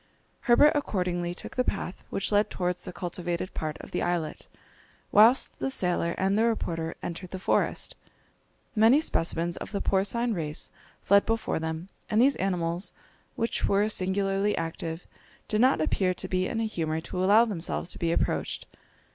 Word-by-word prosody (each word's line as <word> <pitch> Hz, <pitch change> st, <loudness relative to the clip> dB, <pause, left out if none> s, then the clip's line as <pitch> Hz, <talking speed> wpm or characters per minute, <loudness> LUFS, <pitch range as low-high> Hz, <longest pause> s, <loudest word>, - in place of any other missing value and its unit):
Herbert 290 Hz, +5 st, +7 dB
accordingly 180 Hz, -10 st, -1 dB
took -, -, -9 dB
the 250 Hz, -, +2 dB
path 195 Hz, -5 st, -4 dB
which 195 Hz, -, -2 dB
led 205 Hz, 0 st, +3 dB
towards 180 Hz, -1 st, -2 dB
the -, -, -5 dB
cultivated 175 Hz, 0 st, -4 dB
part 155 Hz, -1 st, -3 dB
of -, -, -12 dB
the -, -, -1 dB
islet, 175 Hz, -3 st, -2 dB, 0.6 s
whilst 230 Hz, +5 st, +5 dB
the -, -, -1 dB
sailor 175 Hz, -7 st, 0 dB
and 195 Hz, +1 st, +1 dB
the 220 Hz, -, +3 dB
reporter 165 Hz, -8 st, -1 dB
entered 175 Hz, +2 st, -5 dB
the 190 Hz, -, -5 dB
forest. 185 Hz, -, 0 dB, 0.8 s
Many 225 Hz, +6 st, +6 dB
specimens 170 Hz, -, 0 dB
of -, -, -7 dB
the 200 Hz, -, -2 dB
porcine 225 Hz, +6 st, +1 dB
race 155 Hz, -5 st, -4 dB, 0.3 s
fled 200 Hz, +1 st, +5 dB
before 225 Hz, -6 st, 0 dB
them, 160 Hz, +2 st, -4 dB, 0.2 s
and 215 Hz, -1 st, +2 dB
these 275 Hz, +3 st, +5 dB
animals, 175 Hz, -1 st, -1 dB, 0.4 s
which 230 Hz, -, -1 dB
were 200 Hz, +1 st, +3 dB
singularly 195 Hz, +1 st, 0 dB
active, 165 Hz, 0 st, -4 dB, 0.4 s
did 215 Hz, +1 st, +1 dB
not 260 Hz, -5 st, +4 dB
appear 185 Hz, +3 st, +1 dB
to 185 Hz, -, -3 dB
be 185 Hz, 0 st, 0 dB
in 225 Hz, -, -2 dB
a 225 Hz, -, 0 dB
humour 160 Hz, -7 st, -2 dB
to 180 Hz, +2 st, -3 dB
allow 210 Hz, +5 st, +6 dB
themselves 180 Hz, -4 st, -3 dB
to -, -, -5 dB
be 165 Hz, -1 st, 0 dB
approached. -, -, -1 dB
185 Hz, 165 wpm, -27 LUFS, 170-215 Hz, 0.8 s, Herbert